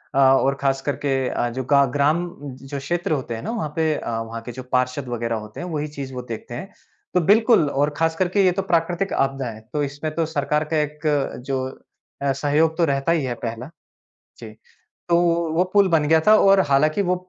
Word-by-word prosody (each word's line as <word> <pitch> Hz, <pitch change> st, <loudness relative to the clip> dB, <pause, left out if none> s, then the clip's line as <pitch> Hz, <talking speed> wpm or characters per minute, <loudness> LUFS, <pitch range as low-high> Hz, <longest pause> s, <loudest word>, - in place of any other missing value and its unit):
अ, -, -, 0 dB
और 135 Hz, 0 st, +4 dB
खासकर 135 Hz, +1 st, 0 dB
के 135 Hz, -, +2 dB, 0.2 s
अ, 120 Hz, -, -1 dB
जो 130 Hz, +2 st, -4 dB
गा 140 Hz, -1 st, +6 dB
ग्राम, 155 Hz, +5 st, +2 dB
जो 135 Hz, 0 st, -7 dB
क्षेत्र 175 Hz, +7 st, -2 dB
होते 130 Hz, -6 st, -2 dB
हैं 115 Hz, -, -6 dB
ना, 225 Hz, -, -3 dB
वहाँ 220 Hz, -10 st, -3 dB
पे 160 Hz, -1 st, +1 dB
अ, -, -, -5 dB
वहाँ 115 Hz, 0 st, -6 dB
के 120 Hz, -, -5 dB
जो 130 Hz, +1 st, -8 dB
पार्षद 125 Hz, +2 st, 0 dB
वगैरह 115 Hz, -1 st, -2 dB
होते 105 Hz, -, -11 dB
हैं, 175 Hz, -, -5 dB
वही 155 Hz, -3 st, -3 dB
चीज़ 140 Hz, -3 st, -7 dB
वो 125 Hz, -, -4 dB
देखते 115 Hz, -, -8 dB
हैं। 190 Hz, +12 st, -7 dB, 0.4 s
तो 180 Hz, -, +3 dB
बिल्कुल, 210 Hz, -, +4 dB
और 145 Hz, +2 st, +1 dB
ख़ासकर 165 Hz, +3 st, +1 dB
के 195 Hz, +1 st, +2 dB
ये 185 Hz, -, +5 dB
तो 190 Hz, +2 st, -1 dB
प्राकृतिक 175 Hz, +1 st, 0 dB
आपदा 135 Hz, -1 st, 0 dB
है, 110 Hz, -, -9 dB
तो 150 Hz, -1 st, 0 dB
इसमें 145 Hz, +2 st, -4 dB
तो 165 Hz, -, +1 dB
सरकार 150 Hz, -1 st, -1 dB
का 155 Hz, -, +3 dB
एक 150 Hz, 0 st, -5 dB, 0.5 s
जो 135 Hz, -1 st, -1 dB, 0.6 s
अ, 140 Hz, 0 st, +1 dB
सहयोग 150 Hz, +4 st, +1 dB
तो 170 Hz, -, +3 dB
रहता 140 Hz, +2 st, 0 dB
ही 165 Hz, -3 st, +1 dB
है, 125 Hz, -, -2 dB
पहला 115 Hz, +4 st, -5 dB, 0.7 s
जी। 110 Hz, -2 st, -11 dB, 0.5 s
तो 170 Hz, -, +4 dB, 0.4 s
वो 170 Hz, -, +3 dB
पुल 200 Hz, -1 st, +5 dB
बन 160 Hz, -3 st, +3 dB
गया 160 Hz, 0 st, +5 dB
था, 215 Hz, -, +8 dB
और 195 Hz, -2 st, +5 dB
हालाँकि 155 Hz, +7 st, +3 dB
वो 180 Hz, -1 st, +1 dB
145 Hz, 215 wpm, -22 LUFS, 135-170 Hz, 0.7 s, था